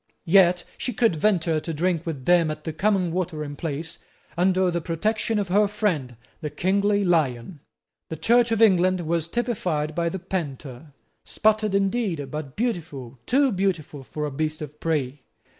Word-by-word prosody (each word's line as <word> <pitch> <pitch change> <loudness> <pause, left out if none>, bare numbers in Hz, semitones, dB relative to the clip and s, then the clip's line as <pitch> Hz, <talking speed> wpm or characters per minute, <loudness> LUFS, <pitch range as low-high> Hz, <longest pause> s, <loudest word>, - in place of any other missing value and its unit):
Yet 180 0 +5 0.2
she 250 - -2
could 225 -5 +2
venture 165 -3 +1
to 165 +1 -5
drink 170 +1 0
with 140 -6 -5
them 175 -2 +4
at 155 0 -5
the 160 - -4
common 185 0 +1
watering 155 -5 -3
place 160 +1 -5 0.4
under 185 +1 +2
the 170 0 -2
protection 215 +7 -1
of 200 -3 -1
her 205 +3 +4
friend, 180 - -2 0.2
the 155 - -4
kingly 200 +6 +1
lion. 150 -3 0 0.5
The 160 - -4
Church 235 +7 +3
of 225 0 +3
England 185 -3 +4
was 165 0 -1
typified 175 -9 -2
by 170 +1 0
the 190 - -4
panther, 150 -6 -6 0.3
spotted 215 -2 +1
indeed, 195 - -1
but 150 -2 -6
beautiful, 155 - -4
too 270 +1 +3
beautiful 180 -7 -2
for 150 +3 -5
a 145 - -4
beast 155 +2 -2
of 150 0 -10
prey. 145 -4 -2
170 Hz, 160 wpm, -24 LUFS, 150-200 Hz, 0.5 s, Yet